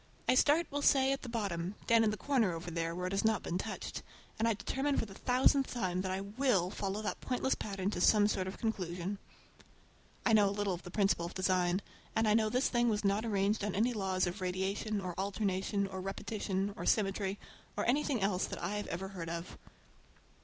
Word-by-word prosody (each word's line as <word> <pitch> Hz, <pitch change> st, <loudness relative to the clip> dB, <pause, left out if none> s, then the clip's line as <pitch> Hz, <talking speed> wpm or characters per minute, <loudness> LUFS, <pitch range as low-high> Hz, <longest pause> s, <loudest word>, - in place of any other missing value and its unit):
I -, -, +5 dB
start, 295 Hz, +6 st, +4 dB
we'll 285 Hz, +1 st, -1 dB
say, 270 Hz, -1 st, +4 dB
at 275 Hz, -, -1 dB
the 250 Hz, -, -7 dB
bottom, 195 Hz, -5 st, -2 dB
down 230 Hz, -1 st, +5 dB
in 220 Hz, -, +3 dB
the 215 Hz, -, -2 dB
corner 240 Hz, -10 st, +1 dB
over 165 Hz, +1 st, -6 dB
there 165 Hz, 0 st, -2 dB
where 180 Hz, +1 st, -3 dB
it 185 Hz, -, -2 dB
has 195 Hz, -, +1 dB
not 220 Hz, -1 st, +2 dB
been 175 Hz, -, -2 dB
touched, 220 Hz, +2 st, -5 dB, 0.4 s
and 225 Hz, -, +2 dB
I 230 Hz, -, +2 dB
determine 270 Hz, +7 st, -1 dB
for -, -, +1 dB
the 200 Hz, -, -11 dB
thousandth 260 Hz, +4 st, +2 dB
time 185 Hz, -6 st, -1 dB
that 190 Hz, -, -3 dB
I 190 Hz, +1 st, -1 dB
will 200 Hz, -3 st, +1 dB
follow 205 Hz, +1 st, -3 dB
that 210 Hz, -, -3 dB
pointless 260 Hz, +1 st, 0 dB
pattern 195 Hz, -1 st, -3 dB
to 175 Hz, -, -3 dB
some 205 Hz, +2 st, +6 dB
sort 190 Hz, -3 st, -1 dB
of 190 Hz, -, -5 dB
a -, -, -15 dB
conclusion. 190 Hz, -3 st, -3 dB, 1.1 s
I 230 Hz, -, +4 dB
know 205 Hz, -2 st, +6 dB
a 200 Hz, -, -4 dB
little 205 Hz, -2 st, 0 dB
of 175 Hz, -, -5 dB
the 180 Hz, -, -9 dB
principle 195 Hz, -3 st, +1 dB
of -, -, -10 dB
design, 185 Hz, 0 st, +1 dB, 0.3 s
and 220 Hz, 0 st, +3 dB
I 210 Hz, -, +4 dB
know 215 Hz, 0 st, +3 dB
this 250 Hz, +4 st, +2 dB
thing 240 Hz, -1 st, +2 dB
was 210 Hz, -1 st, 0 dB
not 200 Hz, +3 st, +2 dB
arranged 205 Hz, 0 st, +1 dB
on 205 Hz, -2 st, -1 dB
any 235 Hz, +5 st, +2 dB
laws 190 Hz, -3 st, 0 dB
of 180 Hz, +3 st, -4 dB
radiation, 195 Hz, +3 st, -1 dB
or 180 Hz, -2 st, -4 dB
alternation, 200 Hz, 0 st, 0 dB
or 190 Hz, -1 st, -5 dB
repetition, 195 Hz, 0 st, -2 dB
or -, -, -5 dB
symmetry, 195 Hz, -1 st, +1 dB, 0.4 s
or 205 Hz, -, 0 dB
anything 265 Hz, -2 st, +1 dB
else 195 Hz, -2 st, +1 dB
that -, -, -6 dB
I 210 Hz, +1 st, -1 dB
ever 190 Hz, -1 st, -4 dB
heard 175 Hz, -4 st, -6 dB
of. 170 Hz, +1 st, -5 dB
200 Hz, 220 wpm, -33 LUFS, 185-225 Hz, 1.1 s, some